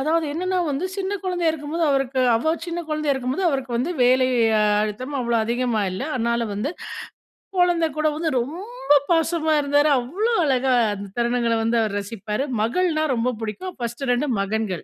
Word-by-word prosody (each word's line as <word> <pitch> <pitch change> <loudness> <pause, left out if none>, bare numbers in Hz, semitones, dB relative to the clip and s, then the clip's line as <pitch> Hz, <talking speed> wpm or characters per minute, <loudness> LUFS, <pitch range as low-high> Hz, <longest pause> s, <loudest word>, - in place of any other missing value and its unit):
அதாவது 315 +3 +1
என்னென்னா 370 +3 -1
வந்து, 280 +6 -2
சின்ன 385 +1 -2
குழந்தையா 355 -3 +1
இருக்கும்போது, 320 +2 -2
அவருக்கு 270 -1 0 0.2
அவ 315 +8 +1
சின்ன 345 0 -3
குழந்தையா 305 -2 0
இருக்கும்போது 265 +8 -2
அவருக்கு 260 -4 -2
வந்து 290 +8 -1
வேலை 255 +1 +4 0.5
அழுத்தம். 255 +7 -4
அவ்வளவு 235 -2 +1
அதிகமா 240 -2 0
இல்ல. 190 - -4
அதனால 235 0 0
வந்து 220 +9 -2 0.9
கொழந்த 350 -2 +3
கூட 310 0 +1
வந்து 320 0 -1
ரொம்ப 385 - -2 0.2
பாசமா 325 -1 +2
இருந்தாரு. 290 +1 +3
அவ்வளோ 380 - -1
அழகா 265 -2 +2 0.2
அந்த 200 0 -7
தருணங்கள 235 -1 +1
வந்து 230 +1 +1
அவர் 210 -2 -1
ரசிப்பாரு. 210 +3 -3 0.2
மகள்னா 310 +8 +1
ரொம்ப 240 +1 0
புடிக்கும் 285 +13 -5
ஃபர்ஸ்ட்டு 240 +2 -4
2ம் 250 0 +1
மகன்கள். 200 -3 -2
270 Hz, 160 wpm, -23 LUFS, 235-325 Hz, 0.9 s, வேலை